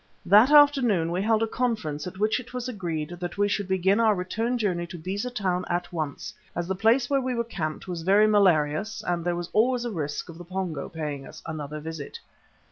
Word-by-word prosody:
That 210 +8 +7
afternoon 270 - +5
we 180 +2 -1
held 220 +1 +2
a - - +1
conference 215 -12 -2
at 180 - -8
which 215 +4 +1
it 250 0 -11
was 250 0 -3
agreed 170 -10 -3
that 175 +1 -5
we 205 0 +3
should 205 -1 -1
begin 190 +2 +2
our 220 -2 +4
return 225 +7 -1
journey 180 -6 -1
to 175 +1 -8
Beza 195 +8 -3
Town 185 -7 -1
at 175 +1 -2
once, 160 +6 -4 0.2
as 175 0 -2
the 190 - 0
place 225 +6 +3
where 275 0 +1
we 255 -1 -2
were 235 - 0
camped 155 -8 -5
was 175 -2 -4
very 200 +5 +5
malarious 195 -2 +2
and 175 -1 -1
there 175 0 0
was 175 0 -5
always 245 +2 +2
a 240 - -2
risk 150 -5 -4
of 165 -1 -11
the - - -7
Pongo 180 -5 -4
paying 150 -4 -5
us - - -12
another 155 -2 -5
visit. 155 -2 -7
190 Hz, 215 wpm, -26 LUFS, 165-225 Hz, 0.2 s, That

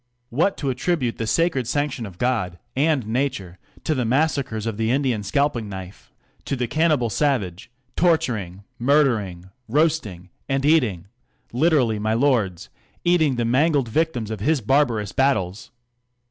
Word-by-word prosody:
What! 170 +11 +1
to 140 -3 -1
attribute 130 -1 -1
the 115 - -2
sacred 160 -4 +1
sanction 140 -3 -2
of 90 -3 -12
God 110 -8 -1 0.2
anci 145 -3 +1
nature 110 -6 -2 0.2
to 155 - 0
the 130 -4 -1
massacres 130 -3 0
of 110 -3 -3
the 110 0 0
Indian 130 -4 +1
scalping 120 +1 0
knifc: 95 -1 -9 0.4
to - - -1
the 125 -1 -1
cannibal 155 -6 +1
savage, 105 - -1 0.3
torturing, 120 - 0 0.2
murdering, 115 -10 +1 0.2
roasting, 120 - 0 0.2
a.^d 135 0 0
eatin; 120 - +2 0.5
'literally, 130 -6 +2
my 110 +1 0
lords, 115 -9 +1 0.3
eating 160 -6 +3
the 120 -1 -1
mangled 135 -1 +2
y 160 - +4
r - - +3
tims 120 -9 -6
of 110 - -4
his 150 +8 +1
barbarous 115 -4 +1
battles! 110 -8 0
125 Hz, 145 wpm, -22 LUFS, 105-145 Hz, 0.5 s, y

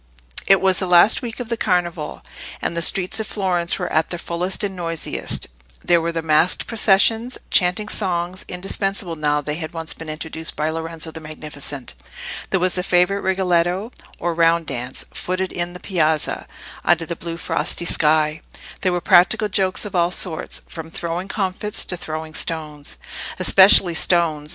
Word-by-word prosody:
It 195 -1 +5
was 190 -1 +4
the 185 - 0
last 180 +4 +6
week 240 -1 -6
of 245 -2 -5
the 235 - 0
Carnival, 175 -7 -1 0.4
and - - -2
the 170 - 0
streets 185 +5 +1
of 220 - -3
Florence 180 -4 -1
were - - -4
at 160 0 +2
their 175 - -4
fullest 175 +3 -2
and 195 -2 -2
noisiest: 165 -2 -2 0.4
there 170 -1 +3
were 170 +1 -1
the 165 -1 -3
masqued 160 +3 +2
processions, 225 +2 +3
chanting 180 +3 +2
songs, 180 -3 -2
indispensable 195 0 -2
now 150 -1 +1
they 150 +1 -3
had 160 -1 -6
once 165 -1 -3
been 165 -1 -9
introduced 160 +1 -5
by 155 +1 -1
Lorenzo 165 0 -4
the 160 - -8
Magnificent; 150 - -6 0.6
there 190 - +1
was 185 0 +2
the 180 - +1
favourite 180 +2 +2
rigoletto, 185 +2 0 0.3
or 175 - -2
round 165 0 +3
dance, 125 -2 -5
footed 185 +1 -3
"in 175 0 -3
piazza" 160 -5 0 0.4
under 165 -1 +3
the 170 - -4
blue 165 0 -6
frosty 175 - -1
sky; 155 -1 +3 0.4
there 185 - +2
were 175 0 -1
practical 185 +6 +4
jokes 190 +1 0
of 210 - -7
all 170 -1 +3
sorts, 180 -2 -1
from 160 -1 -8
throwing 170 +3 -3
comfits 200 +1 -2
to 180 - -2
throwing 155 -2 -5
stones—especially 165 +4 +3
stones. 160 -3 +1
175 Hz, 165 wpm, -21 LUFS, 160-190 Hz, 0.6 s, last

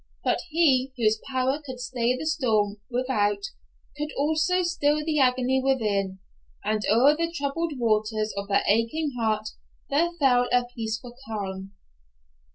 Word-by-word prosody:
But - - +1
He, 275 -5 +3
whose 220 -2 +2
power 260 +2 0
could 260 -3 -8
stay 245 0 -1
the 305 - -5
storm 220 -10 +1
without, 250 - 0 0.5
could 300 0 -3
also 315 +5 +2
still 300 -3 +1
the 310 -2 +1
agony 255 0 +2
within, 205 -8 0 0.5
and 215 0 0
o'er 255 +8 +5
the 335 +1 -1
troubled 325 +1 -2
waters 215 -2 0
of 200 0 -4
that 200 - +2
aching 230 +9 +1
heart 215 -2 0 0.4
there 320 +5 +3
fell 255 -6 +3
a 245 0 +3
peaceful 225 +1 -4
calm. 195 -3 -5
250 Hz, 140 wpm, -26 LUFS, 215-295 Hz, 0.5 s, o'er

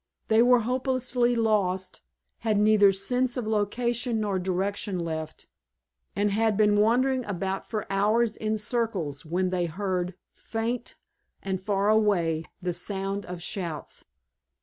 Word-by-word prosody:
They 220 +1 +5
were 245 0 +5
hopelessly 250 0 +1
lost, 200 -5 0 0.4
had 215 -2 +1
neither 210 -1 +6
sense 250 +6 -1
of 245 - -2
location 230 +3 0
nor 200 -3 0
direction 190 +2 -2
left, 160 -2 -5 0.7
and 205 0 +1
had 220 0 +2
been 210 -1 +4
wandering 255 +4 +3
about 195 -1 -3
for 215 -2 -2
hours 215 +3 +2
in 215 0 -1
circles 210 - -2
when 180 +3 0
they 175 -2 0
heard, 180 0 -2 0.2
faint 230 +2 -4 0.5
and 190 -1 -2
far 200 0 0
away, 180 -7 +2 0.2
the 180 -1 -1
sound 195 +2 -3
of 180 -1 -6
shouts. 170 -5 -4
205 Hz, 130 wpm, -27 LUFS, 185-230 Hz, 0.7 s, neither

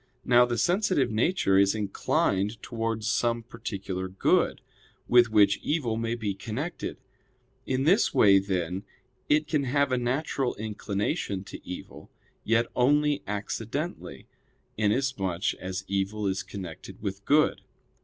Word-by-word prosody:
Now 125 0 +6
the 120 -1 -2
sensitive 180 - +2
nature 110 - +2
is 100 +1 +4
inclined 100 0 0
towards 115 -2 -3
some 120 -1 +1
particular 100 -5 -5
good, 95 +1 +1 0.5
with 120 -1 +6
which 105 -2 +4
evil 140 -8 -1
may 115 +1 -1
be 110 -4 -2
connected. 120 - -5 0.7
In 130 0 0
this 185 +9 +4
way, 100 -2 +6
then, 95 -1 -2 0.5
it 150 +1 +3
can 145 -4 0
have 140 +1 +1
a 125 - +2
natural 130 +1 -1
inclination 105 - -3
to - - -10
evil; 90 - -9 0.3
yet 115 +1 +2
only 145 +3 +3
accidentally, 100 -1 -4 0.5
inasmuch 105 -5 0
as 95 +1 -4
evil 100 +2 -1
is 95 -1 0
connected 90 -5 -9
with 100 -1 -4
good. 150 +6 +3
110 Hz, 125 wpm, -27 LUFS, 100-130 Hz, 0.7 s, Now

